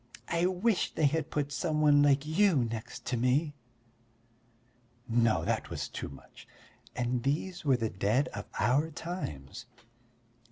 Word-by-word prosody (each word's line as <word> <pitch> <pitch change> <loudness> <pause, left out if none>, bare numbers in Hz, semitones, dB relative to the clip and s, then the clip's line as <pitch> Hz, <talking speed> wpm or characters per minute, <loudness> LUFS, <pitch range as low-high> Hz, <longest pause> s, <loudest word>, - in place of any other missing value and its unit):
"I 170 +1 +2
wish 190 +3 0
they 155 - +2
had 155 +2 +1
put 145 -2 -2
some 155 +1 -1
one 145 -1 +5
like 140 0 +4
you 180 +4 +3
next 115 +1 -6
to 125 0 -1
me." 135 +6 +1 1.5
No, 115 -1 +2
that - - -1
was - - -4
too - - -6
much! 70 - -14 0.5
And 125 0 -1
these 155 +8 -2
were 135 -4 +3
the 115 -2 -2
dead 105 +8 +1
of 105 0 -7
our 135 +8 +2
times! 125 - -6
140 Hz, 145 wpm, -30 LUFS, 120-160 Hz, 1.5 s, one